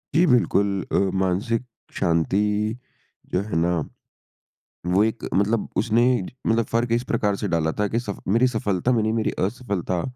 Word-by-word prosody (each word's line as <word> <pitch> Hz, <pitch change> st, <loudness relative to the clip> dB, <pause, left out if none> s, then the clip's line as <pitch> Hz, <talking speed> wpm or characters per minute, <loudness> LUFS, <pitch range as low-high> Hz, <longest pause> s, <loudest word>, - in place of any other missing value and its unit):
जी, 175 Hz, +2 st, +5 dB
बिल्कुल 115 Hz, -5 st, +3 dB, 0.2 s
अ, -, -, 0 dB, 0.3 s
मानसिक 110 Hz, +6 st, 0 dB, 0.3 s
शांति 85 Hz, +1 st, +1 dB, 1.0 s
जो 90 Hz, -, +2 dB
है 105 Hz, -3 st, -5 dB
ना, 85 Hz, +2 st, +2 dB, 1.1 s
वो 95 Hz, +4 st, +3 dB
एक 110 Hz, +1 st, -2 dB
मतलब– 105 Hz, +3 st, +1 dB
उसने 115 Hz, +1 st, +3 dB, 0.4 s
मतलब 115 Hz, -1 st, +2 dB
फ़र्क 115 Hz, +1 st, -1 dB
इस 120 Hz, +1 st, +2 dB
प्रकार 105 Hz, -3 st, +1 dB
से 105 Hz, -, -3 dB
डाला 80 Hz, -3 st, +1 dB
था 105 Hz, -, +2 dB
कि 115 Hz, +4 st, -1 dB
सफ 100 Hz, -5 st, -6 dB
मेरी 115 Hz, +6 st, +4 dB
सफलता 110 Hz, -1 st, 0 dB
में 115 Hz, -3 st, +2 dB
नहीं, 110 Hz, +1 st, 0 dB
मेरी 115 Hz, -1 st, 0 dB
असफलता 100 Hz, -6 st, -2 dB
105 Hz, 160 wpm, -23 LUFS, 95-115 Hz, 1.1 s, जी